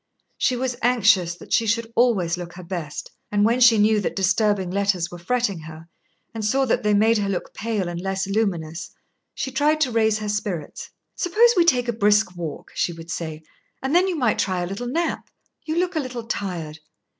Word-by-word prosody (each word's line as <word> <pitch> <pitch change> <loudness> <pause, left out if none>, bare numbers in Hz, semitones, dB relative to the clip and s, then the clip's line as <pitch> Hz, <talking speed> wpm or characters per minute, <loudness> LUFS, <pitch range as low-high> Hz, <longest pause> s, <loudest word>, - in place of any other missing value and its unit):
She 255 - +2
was 250 0 -2
anxious 215 -8 +3
that - - -8
she 225 - +3
should 230 +1 -1
always 205 -9 +2
look 175 -1 -8
her 185 - -10
best, 170 -4 -6 0.2
and 205 0 +3
when 235 +3 +2
she 235 -2 +7
knew 210 +1 +4
that - - -3
disturbing 195 -1 +1
letters 195 -3 0
were 175 - -8
fretting 205 0 -1
her, 160 +1 -11 0.4
and 225 -1 -5
saw 265 +6 +2
that 245 0 +1
they 210 -2 +2
made 220 +2 +4
her 200 -1 -1
look 190 - -3
pale 215 -4 -2
and 175 0 -4
less 195 0 -2
luminous, 185 -6 -2 0.5
she 265 - -3
tried 295 +4 +2
to 265 -5 +2
raise 220 -2 +2
her 215 -1 -4
spirits. 200 -7 -4 0.3
"Suppose 450 +7 +4
we 350 -2 +4
take 250 -7 +3
a 235 - 0
brisk 210 -3 +2
walk," 165 -4 -6
she 175 - -1
would 165 +1 -9
say, 160 -2 -5 0.4
"and 265 +2 -1
then 365 +2 +5
you 370 - -1
might 245 -8 +1
try 185 -2 0
a - - -1
little 195 +7 -5
nap. 330 +7 -2 0.4
You 315 - -1
look 360 +1 0
a - - +2
little 250 -4 -5
tired." 175 -8 -4
210 Hz, 205 wpm, -23 LUFS, 180-245 Hz, 0.5 s, she